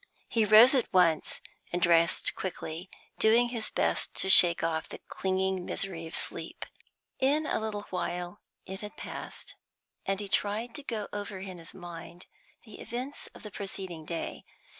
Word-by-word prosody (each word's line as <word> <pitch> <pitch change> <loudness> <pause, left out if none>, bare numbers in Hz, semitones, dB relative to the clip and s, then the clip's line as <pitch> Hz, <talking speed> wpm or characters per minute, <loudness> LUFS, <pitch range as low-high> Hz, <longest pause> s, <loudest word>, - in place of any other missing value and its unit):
He 225 -2 +2
rose 220 +5 +8
at 260 -3 +1
once, 175 -4 +2 0.3
and 175 - 0
dressed 170 -1 +3
quickly, 175 -1 -5 0.3
doing 235 +2 +5
his 230 -3 -1
best - - 0
to 190 - +3
shake 175 -2 +8
off 160 -1 -1
the - - -7
clinging 190 -1 -1
misery 175 -3 -3
of 160 - -7
sleep. - - -2 0.5
In 290 +4 +2
a - - 0
little 215 -2 -4
while 180 +1 -4 0.2
it 190 +1 -6
had 210 0 -8
passed, - - -8 0.5
and 195 0 0
he 205 - -4
tried 210 +4 -1
to 290 - -6
go 225 -7 -4
over 205 -1 -5
in 185 -2 -8
his 165 +1 -10
mind 175 -1 -9 0.4
the 215 - -11
events 255 +5 -6
of - - -13
the 210 - -8
preceding 190 -4 -6
day. 165 +1 -5
190 Hz, 160 wpm, -29 LUFS, 175-220 Hz, 0.5 s, rose